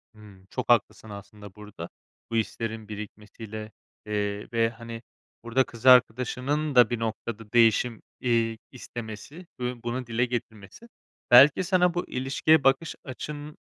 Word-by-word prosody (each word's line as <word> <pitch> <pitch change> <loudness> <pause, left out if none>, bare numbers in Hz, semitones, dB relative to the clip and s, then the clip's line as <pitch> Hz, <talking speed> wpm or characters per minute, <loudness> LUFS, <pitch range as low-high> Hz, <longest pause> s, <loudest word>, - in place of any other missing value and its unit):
Hımm, 100 -3 -16
çok 125 -1 -5
haklısın 115 -1 +2
aslında 100 -1 -11
burada. 105 -5 -9 0.4
Bu - - -2
hislerin 110 -1 -3
birikmesiyle, 105 +1 -8 0.3
eee, 105 -1 -2
ve, 115 -1 +2
hani, 115 0 -9 0.4
burada 120 +3 +2
kız 115 -1 -13
arkadaşının 130 +4 +3
da 125 -1 +7
bir 120 - -2
noktada 115 -1 -5
değişim, 115 0 +3 0.2
iii, 115 -2 +1
istemesi 120 - -9
ve 125 -1 -4
bunu 120 +1 -3
dile 120 +1 +1
getirmesi 120 - -7 0.4
belki 135 +8 +8
sana 180 -1 +2
bu 175 - -2
ilişkiye 135 +4 +2
bakış 135 +5 +2
açın 150 +3 -7
115 Hz, 130 wpm, -26 LUFS, 110-130 Hz, 0.4 s, belki